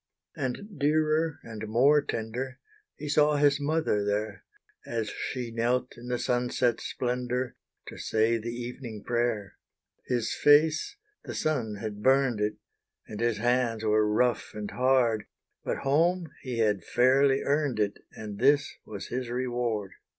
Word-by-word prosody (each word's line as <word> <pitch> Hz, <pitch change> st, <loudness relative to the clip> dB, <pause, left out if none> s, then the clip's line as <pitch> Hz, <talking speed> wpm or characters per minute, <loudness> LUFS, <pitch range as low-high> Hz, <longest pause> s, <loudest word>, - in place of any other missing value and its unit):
And 160 Hz, -, -5 dB
dearer 155 Hz, +1 st, +2 dB
and 110 Hz, -1 st, -7 dB
more 135 Hz, +7 st, +5 dB
tender, 125 Hz, +2 st, -4 dB, 0.4 s
He 150 Hz, -, -7 dB
saw 150 Hz, 0 st, +4 dB
his 145 Hz, 0 st, +3 dB
mother 145 Hz, -8 st, +1 dB
there, 105 Hz, -1 st, -2 dB, 0.4 s
As 115 Hz, -3 st, -3 dB
she 125 Hz, -3 st, -4 dB
knelt 120 Hz, +2 st, 0 dB
in 120 Hz, +1 st, -11 dB
the 125 Hz, 0 st, 0 dB
sunset 120 Hz, -1 st, 0 dB
splendour, 125 Hz, 0 st, -2 dB, 0.3 s
To -, -, -10 dB
say 110 Hz, +1 st, +1 dB
the 115 Hz, +2 st, -5 dB
evening 120 Hz, -2 st, -6 dB
prayer. 120 Hz, -5 st, -1 dB, 0.5 s
His 120 Hz, -3 st, 0 dB
face 155 Hz, +2 st, +4 dB, 0.3 s
the -, -, -6 dB
sun 125 Hz, -9 st, -1 dB
had 105 Hz, 0 st, -6 dB
burned 130 Hz, -3 st, +3 dB
it, 105 Hz, 0 st, 0 dB, 0.5 s
And 105 Hz, -, -8 dB
his 115 Hz, -2 st, +1 dB
hands 120 Hz, -1 st, +1 dB
were 105 Hz, -1 st, +3 dB
rough 120 Hz, +1 st, +1 dB
and 105 Hz, -1 st, -5 dB
hard, 125 Hz, -4 st, +2 dB, 0.4 s
But -, -, -2 dB
home, 165 Hz, +5 st, +2 dB
he 125 Hz, -4 st, -4 dB
had 105 Hz, -5 st, +1 dB
fairly 135 Hz, +4 st, +3 dB
earned 145 Hz, -4 st, 0 dB
it, 105 Hz, -1 st, 0 dB
And 105 Hz, -2 st, -8 dB
this 145 Hz, 0 st, +3 dB
was 100 Hz, -2 st, -7 dB
his 125 Hz, -1 st, -3 dB
reward! 120 Hz, -5 st, -2 dB
120 Hz, 145 wpm, -28 LUFS, 110-140 Hz, 0.5 s, more